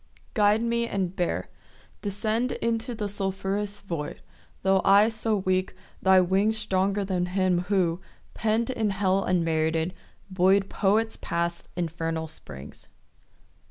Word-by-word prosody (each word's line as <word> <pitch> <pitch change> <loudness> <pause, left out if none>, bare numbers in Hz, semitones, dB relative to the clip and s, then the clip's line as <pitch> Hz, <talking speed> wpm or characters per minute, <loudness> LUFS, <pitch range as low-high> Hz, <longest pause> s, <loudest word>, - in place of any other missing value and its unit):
Guide 210 +2 +3
me 235 0 0
and 190 -4 -2
bear. 175 - -1 0.5
Descend 215 +5 -1
Into 230 +1 -2
the 210 -2 -2
sulphurous 200 +1 -2
void— 165 -6 -5 0.4
Tho' 190 0 +4
I 205 +3 +6
so 220 -1 0
weak, 185 -1 0 0.3
thy 190 0 +6
wings 195 +5 +2
Stronger 200 -1 0
than 180 -2 -1
him 185 -1 +1
who, 180 -3 +1 0.3
pen'd 225 +3 0
In 225 -4 0
hell 195 0 +1
unmerited, 165 -1 +1 0.4
buoy'd 190 +2 +3
Poets 220 +3 +1
past 170 0 -2
infernal 165 -1 -2
springs. 75 - -10
195 Hz, 125 wpm, -26 LUFS, 180-210 Hz, 0.5 s, I